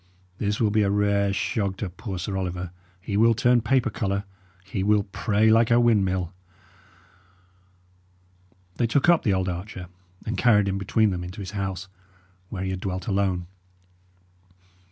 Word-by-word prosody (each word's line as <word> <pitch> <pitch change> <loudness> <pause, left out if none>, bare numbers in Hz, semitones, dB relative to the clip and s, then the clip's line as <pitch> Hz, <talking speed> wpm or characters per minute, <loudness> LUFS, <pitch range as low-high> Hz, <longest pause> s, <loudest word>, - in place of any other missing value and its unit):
This 105 0 -1
will 110 -3 +2
be 110 +1 +3
a 100 - +2
rare 100 0 +2
shog 100 0 -1
to 105 - -3
poor 95 +2 -6
Sir 95 +3 -4
Oliver; 90 -1 -3 0.3
he 100 +2 -4
will 115 +1 +5
turn 120 +1 +3
paper 120 0 +1
colour; 100 -1 -2 0.4
he 95 0 -3
will 105 0 +3
pray 105 +2 +1
like 115 0 +4
a 120 0 +5
windmill." 95 -6 +2 2.4
They 120 - +2
took 140 +8 +2
up 170 -2 +5
the 100 -5 +1
old 95 0 -1
archer, 90 0 -6 0.4
and 115 - -3
carried 105 -5 +4
him 95 0 -1
between 105 +2 +2
them 90 -1 -3
into 90 +5 -8
his 95 -2 -6
house, 95 -1 -4 0.6
where 95 -3 -4
he 95 - -2
had 95 - -3
dwelt 95 -1 -4
alone. 95 -4 0
100 Hz, 160 wpm, -25 LUFS, 95-110 Hz, 2.4 s, will